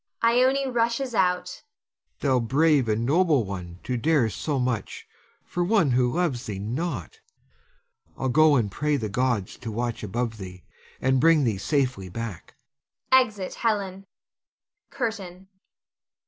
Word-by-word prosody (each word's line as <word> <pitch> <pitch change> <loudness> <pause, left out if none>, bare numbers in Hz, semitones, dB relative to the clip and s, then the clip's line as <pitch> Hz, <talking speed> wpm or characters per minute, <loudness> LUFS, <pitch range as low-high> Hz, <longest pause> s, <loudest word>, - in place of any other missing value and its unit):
[Ione 255 +4 +3
rushes 235 +2 0
out. 180 -2 0 0.6
Helon. 130 -3 +2
Thou 115 - -4
brave 145 -2 +3
and 110 +2 0
noble 155 -2 +3
one 90 -3 -7
to 125 0 -2
dare 135 -3 +2
so 145 +5 -2
much 125 -5 -3 0.4
for 175 - -2
one 175 - +3
who 125 0 +2
loves 165 -9 -1
thee 105 -3 -4
not! 120 - -4 1.0
I'll 135 - -1
go 155 +3 +5
and 110 -6 +1
pray 150 +6 0
the 110 -5 -3
gods 120 -3 -1
to 115 - -6
watch 120 +1 -3
above 115 +2 -3
thee, 90 -1 -9 0.4
and 130 0 +2
bring 165 -2 +5
thee 110 -6 0
safely 125 -8 -1
back. 110 -3 -7 0.6
[Exit 220 -8 +3
Helon. 195 -4 -2 0.8
CURTAIN. 195 -7 -4
135 Hz, 135 wpm, -25 LUFS, 115-180 Hz, 1.0 s, go